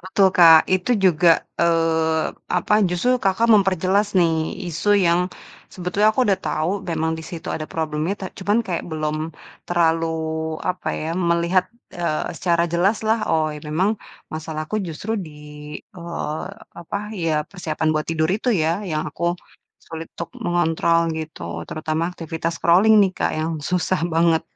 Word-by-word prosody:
Betul 195 -1 +6
Kak, 165 -2 +9
itu 185 +6 +1
juga, 170 -1 +4 0.2
eee, 165 -1 +2 0.3
apa, 195 - 0 0.2
justru 245 +9 +1
Kakak 195 +4 +2
memperjelas 195 0 +3
nih, 165 -3 +2
isu 175 +5 -2 0.2
yang 170 +1 +4 0.5
sebetulnya 185 +4 +1
aku 260 - +3
udah 200 -4 +1
tau 175 +6 -1
memang 160 -1 0
di - - -6
situ 170 -2 -7
ada 155 -1 -4
problemnya, 160 +2 -2
ta 195 - -7
cuman 205 +3 +1
kayak 175 -3 -2
belum 155 -1 -2 0.5
terlalu, 165 -1 +2 0.6
apa 180 - -3
ya, 160 +1 -3
melihat, 170 +1 +1 0.3
eee, 170 -3 -2
secara 170 -2 +2
jelas 195 +6 +2
lah, 220 +1 +2
oh, 155 -1 +1 0.2
memang 170 +7 +1 0.4
masalahku 155 +5 -4
justru 165 +7 -5
di, 160 -5 -7 0.7
eee, 170 -2 -4 0.4
apa, 170 +4 -4
ya 165 -6 0
persiapan 160 -4 -3
buat 155 0 -1
tidur 160 -1 0
itu 220 +6 -2 0.2
ya, 165 +4 +1
yang 155 -2 -1
aku 175 +3 -1 0.5
sulit 160 0 -7
untuk 170 - -5
mengontrol, 170 -1 +2 0.2
gitu. 85 - -6
Terutama 155 +1 -2
aktivitas 165 +1 -3
scrolling 195 +6 +5
nih 190 - +1
Kak - - 0
yang 160 +1 -1
susah 180 +4 0
banget, 165 0 +3
170 Hz, 145 wpm, -22 LUFS, 160-185 Hz, 0.7 s, Kak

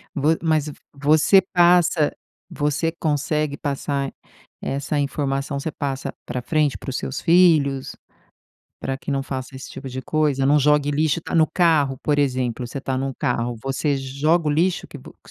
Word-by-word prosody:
Vo 155 +3 +2
mas 155 -2 +1
v 150 - -6 0.2
você 155 +7 +4
passa 175 -3 +4 0.4
você 150 +2 -1
consegue 150 -1 -1
passar 140 -1 -2 0.5
essa 140 +2 -2
informação, 140 0 -2
você 160 - -3
passa 135 -2 -4
pra 125 - -4
frente, 150 +1 +1
para - - -7
os 125 - -3
seus 130 - -4
filhos, 160 -6 +3 0.8
pra 135 0 -3
que 145 - -6
não 135 -1 0
faça 130 -1 -6
esse 130 - -9
tipo 135 - -8
de 130 +1 -6
coisa? 150 -3 +1
Não 145 +2 +4
jogue 145 0 +3
lixo, 150 +1 +1
tá - - -6
no 160 -2 +5
carro, 155 -7 +2
por 145 -1 +1
exemplo, 130 -3 0
você 125 - -6
tá 130 -1 -2
num 135 0 -3
carro, 120 -3 -1
você 135 +2 0
joga 145 +5 0
o - - +2
lixo 170 +4 +1
que - - -10
vo - - -13
que - - -16
145 Hz, 175 wpm, -22 LUFS, 135-155 Hz, 0.8 s, no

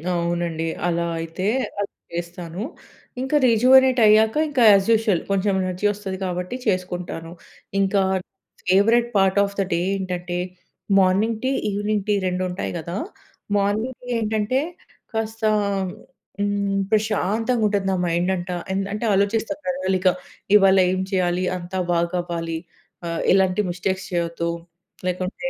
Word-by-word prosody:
అవునండి. 170 -1 -1 0.2
అలా 170 0 0
అయితే 165 +3 -4 0.3
అలా 205 - +1 0.3
చేస్తాను. 170 +1 -5 0.6
ఇంకా 265 +3 -1
రిజివోనేట్ 255 +2 +5
అయ్యాక 220 +1 +5
ఇంకా 265 -4 +2
యాజ్ 195 0 +4
యూజువల్ 220 -6 +2
కొంచెం 195 +1 +1
ఎనర్జీ 185 +2 -3
వస్తది 195 -2 -5
కాబట్టి 180 +4 -3
చేసుకుంటాను. 180 -3 -2 0.5
ఇంకా 195 0 +2 0.7
favourite 225 +6 +4
part 195 0 +3
of 200 0 -3
the - - +4
day 170 - +1 0.2
ఏంటంటే, 180 -2 -3 0.6
మార్నింగ్ 195 +4 +2
టీ, 260 - +1 0.2
ఈవెనింగ్ 205 0 -1
టీ 210 - +3
2 180 0 -1
ఉంటాయి 180 +2 -4
కదా! 170 +2 -5 0.6
మార్నింగ్ 210 +5 0
టీ 250 - -13
ఏంటంటే 220 +3 0 0.5
కాస్త 225 0 -3 1.0
హ్మ్, 200 -1 0
ప్రశాంతంగా 220 +2 +1
ఉంటది 200 -2 0
నా - - +1
మైండ్ 175 +1 0
అంటా, 180 0 -4 0.2
ఎన్ 190 - 0
అంటే 210 +3 -3
ఆలోచిస్తా 205 +6 +1
ప్రణాళిక. 190 -9 0 0.5
ఇవాళ 195 -1 +6
ఏం 185 0 0
చేయాలి, 180 -1 +1
అంతా 180 +1 -5
బాగవ్వాలి 170 -1 -1 0.5
ఆహ్, 165 0 -2
ఎలాంటి 190 +1 +3
మిస్టేక్స్ 185 +2 -2
చేయొద్దు 170 -1 -1 0.6
లేకుంటే, 185 +8 -3
190 Hz, 125 wpm, -22 LUFS, 175-215 Hz, 1.0 s, ఇవాళ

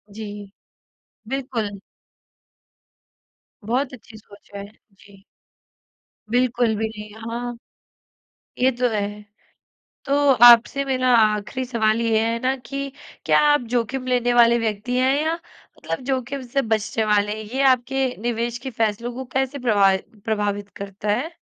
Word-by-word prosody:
जी। 205 -2 -8 0.8
बिल्कुल। 235 -7 -3 1.9
बहुत 255 +5 -1
अच्छी 225 -2 -13
सोच 205 -1 -18
है। 200 0 -6 0.3
जी। 195 0 -19 1.1
बिल्कुल 245 -1 +1
भी 220 +1 -1
नहीं, 210 -1 -9 0.2
हाँ। 240 +1 -4 1.0
ये 255 +1 +4
तो 250 0 +2
है। 205 -1 -3 0.8
तो 280 - 0 0.3
आपसे 240 +3 +7
मेरा 255 -2 +1
आख़िरी 215 +3 +1
सवाल 230 -3 +1
ये 225 -1 +2
है 230 +1 0
ना 260 +2 +1
कि 275 +3 -6 0.3
क्या - - +4
आप 295 - +3
जोखिम 255 +2 -1
लेने 245 -1 +1
वाले 235 0 +5
व्यक्ति 225 +2 -2
हैं 260 +1 +3
या 320 +1 0
मतलब 335 -3 -9
जोखिम 265 +1 -2
से 275 +3 0
बचने 220 0 -1
वाले 210 -1 +2
हैं? 220 - -7
ये 270 - +1
आपके 265 +1 +1 0.2
निवेश 235 0 -2
के 260 +2 -6
फैसलों 230 +1 -1
को 260 +2 -5
कैसे 265 +1 -1
प्रभाव 205 -6 +3 0.3
प्रभावित 205 -2 -1
करता 200 +1 -6
है? 270 +11 -2
235 Hz, 135 wpm, -22 LUFS, 215-255 Hz, 1.9 s, आपसे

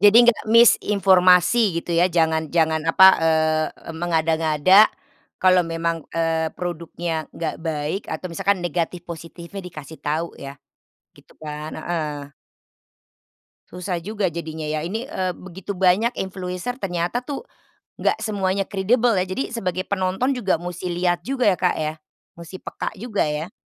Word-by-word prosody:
Jadi, 205 +2 +7
nggak 240 -2 +3
miss 230 0 +7
informasi 190 +1 +4
gitu 170 - -5
ya, 180 - +4
jangan 160 -2 +1
jangan 160 -1 +2
apa, 190 +3 +7
eee 160 -1 +2 0.3
,mengada-ngada 165 +3 +4 0.5
kalau 185 -1 +5
memang, 165 -1 -2
eee, 165 -1 +1
produknya 170 -2 -4
enggak 165 - -4
baik 160 +3 -3
atau 160 +3 -4
misalkan 195 +2 0
negatif 175 +1 -2
positifnya 170 +3 -8
dikasih 160 -3 -10
tahu 160 +3 -2
ya 140 +1 -8 0.6
gitu - - -20
kan? 150 0 -6
Heeh. 150 -4 -4 1.4
Susah 180 -1 -4
juga 205 0 -2
jadinya 160 -1 -5
ya, 155 0 -2
ini, 200 +9 -4
eee, 185 -10 -2
begitu 190 +2 -8
banyak 190 +6 +2
influencer 190 +6 -4
ternyata 175 +4 -1
tuh 280 - -6 0.6
enggak - - +2
semuanya 195 -2 -1
kredibel 225 +5 +2
ya. 185 - +2
Jadi 190 +10 -4
sebagai 185 -4 -2
penonton 195 +7 0
juga 200 -9 0
musti 180 +1 -5
lihat 175 0 0
juga 255 +2 0
ya, 190 -3 +3
Kak, 180 - +2
ya 155 0 -1 0.4
musti 170 +2 -10
peka - - -5
juga 220 -2 -1
ya. 150 +3 -3
175 Hz, 140 wpm, -22 LUFS, 160-195 Hz, 1.4 s, Jadi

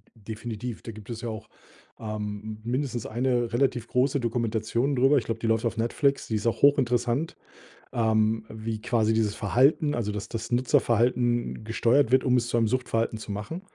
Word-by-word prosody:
D 110 0 -8
definitiv, 115 +1 -6
da 115 - -7
gibt 105 0 -12
es 115 -1 -5
ja 120 - -4
auch, 110 -1 -7 0.5
ähm, 105 0 -5
mindestens 125 0 -2
1 120 0 0
relativ 120 -2 +1
große 130 +2 +1
Dokumentation 115 +2 -1
darüber. 135 +3 +4
Ich 125 - 0
glaube, 115 -1 -3
die 115 - -2
läuft 110 +1 +1
auf 115 0 -1
Netflix. 140 +5 0
Die 110 - -2
ist 105 - -2
auch 115 - -1
hochinteressant, 130 0 +2 0.6
ähm, 110 -1 +1
wie 110 0 -5
quasi 110 -2 +1
dieses 110 -2 +1
Verhalten 135 - +2
also, 110 -3 -2
dass 105 0 -5
das 115 +1 -5
Nutzerverhalten 120 -1 +1
gesteuert 115 +3 +2
wird, 130 0 +4
um 125 -1 +3
es 120 -1 0
zu 120 - 0
einem 115 -1 +3
Suchtverhalten 115 -2 -1
zu 110 - -8
machen. 105 - -5
115 Hz, 185 wpm, -26 LUFS, 110-125 Hz, 0.6 s, darüber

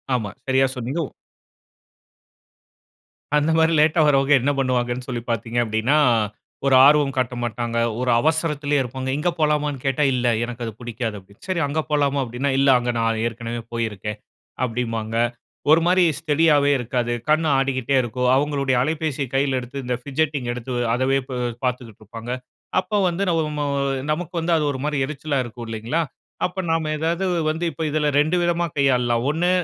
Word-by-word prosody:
ஆமா. 105 -5 -2 0.2
சரியா 130 0 +3
சொன்னீங்க. 130 +6 -3
உ - - -14 2.3
அந்த 150 +2 +2
மாரி 160 0 +4
லேட்டா 155 +2 +4
வர்றவங்க 140 -1 +4
என்ன 140 +4 +2
பண்ணுவாங்கன்னு 125 -1 0
சொல்லி 120 -3 -3
பார்த்தீங்க 115 +1 -2
அப்படீன்னா, 110 +6 +1 0.7
ஒரு 135 -1 +5
ஆர்வம் 145 -1 +4
காட்ட 125 -1 0
மாட்டாங்க, 120 0 -3 0.2
ஒரு 125 - 0
அவசரத்துலே 150 -1 +1
இருப்பாங்க.இங்க 130 +5 -2
போலாமான்னு 150 -3 0
கேட்டா, 135 +2 +1
"இல்ல 125 -1 0 0.2
எனக்கு 120 0 -5
அது 115 - -4
புடிக்காது" 120 -2 -4
அப்படின்னு, 100 +2 -19
"சரி 185 -3 0
அங்க 155 +3 -1
போலாமா?" 145 -1 +2
அப்டின்னா. 125 +3 -2
"இல்ல 135 0 +4
அங்க 120 0 -1
நான் 115 -1 0
ஏற்கனவே 115 0 -4
போயிருக்கேன்." 105 -2 -3 0.5
அப்படிம்பாங்க. 115 -2 -2 0.6
ஒரு 165 +1 +6
மாரி 180 +1 +4 0.2
ஸ்டடியாவே 150 -2 +3
இருக்காது. 120 0 -1 0.2
கண் 155 +1 +3
ஆடிகிட்டே 135 -1 0
இருக்கும். 125 +1 -1
அவங்களுடைய 140 -1 +1
அலைபேசிய 155 -1 -1
கையில 135 -1 +2
எடுத்து, 135 +3 -7
இந்த 125 0 -1
ஃபிட்ஜெட்டிங் 140 -2 -1
எடுத்து 125 +1 -6 0.2
அதவே 130 +2 +2
பு - - -5 0.3
பார்த்துக்கிட்டு 125 -4 -4
இருப்பாங்க. 115 +3 -8 0.5
அப்போ 210 +3 -3
வந்து 175 +3 -2
நம்மோ 155 -3 0 0.5
நமக்கு 170 +3 -3
வந்து 165 +1 -1
அது 155 - 0
ஒரு 130 - -5
மாரி 150 -1 -1
எரிச்சலா 145 0 -3
இருக்கும். 120 0 -8
இல்லைங்களா? 115 +9 -1 0.4
அப்ப 180 +1 -4
நாம 165 -1 0
ஏதாவது 165 +4 -1 0.2
வந்து 160 +2 -2
இப்ப 160 - -5
இதுல 150 0 0
2 155 +4 +2
விதமா 175 0 +1
கையாளலாம். 125 -4 +2
1 165 +4 +1
135 Hz, 155 wpm, -22 LUFS, 120-150 Hz, 2.3 s, ஒரு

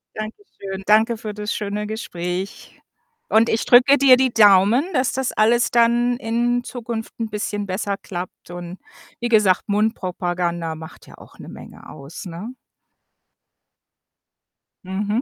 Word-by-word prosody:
danke 215 +1 -6 0.2
schön. 195 -1 -6
Danke 220 +2 +3
für 215 -2 -6
das 210 0 -4
schöne 210 0 -3
Gespräch 185 -3 -6 0.5
und 225 +2 +4
ich 225 - 0
drücke 255 +3 +6
dir 260 -2 +6
die 260 -2 +1
Daumen, 210 - +5
dass 255 -2 +1
das 265 -1 -2
alles 235 +3 +2
dann 240 +1 +2
in 240 0 0
Zukunft 235 -2 -6
'n 225 -1 -3
bisschen 205 -1 -3
besser 195 +1 -2
klappt 180 -1 -8
und 175 +1 -8 0.4
wie 240 0 -2
gesagt, 210 -5 +3
Mundpropaganda 180 -5 -1
macht 160 0 -12
ja - - -15
auch - - -17
'ne - - -10
Menge - - -12
aus, 140 +7 -10
ne? 180 +8 -7 2.3
Mhm. 205 +5 -2
215 Hz, 140 wpm, -21 LUFS, 190-235 Hz, 2.3 s, drücke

